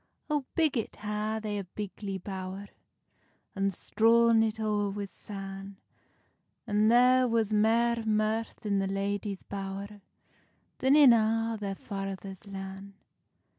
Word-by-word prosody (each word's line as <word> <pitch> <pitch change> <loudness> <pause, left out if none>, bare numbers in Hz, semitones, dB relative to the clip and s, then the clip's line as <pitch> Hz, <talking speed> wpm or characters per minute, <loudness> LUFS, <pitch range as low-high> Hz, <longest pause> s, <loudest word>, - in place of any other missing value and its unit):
O, 295 -3 0
biggit 295 -9 +1
ha 210 +1 -2
they 210 -1 -3
a - - -4
bigly 195 +1 -6
bowr, 190 +1 -6 0.9
And 195 0 +1
strawn 230 +4 +4
it 220 0 0
oer 210 -2 0
wi 200 +1 -4
san, 195 0 -8 0.9
And 210 +1 +3
there 250 +1 +5
was 225 -2 +1
mair 230 +2 +3
mirth 220 +1 -1
i - - -2
the 195 -1 +1
ladies' 200 0 -2
bowr 200 +1 -6 0.8
Than 265 +2 +4
in 285 -5 +8
a' 225 0 +2
their 200 -1 -3
father's 195 0 -6
lan. 195 0 -8
210 Hz, 125 wpm, -29 LUFS, 195-225 Hz, 0.9 s, in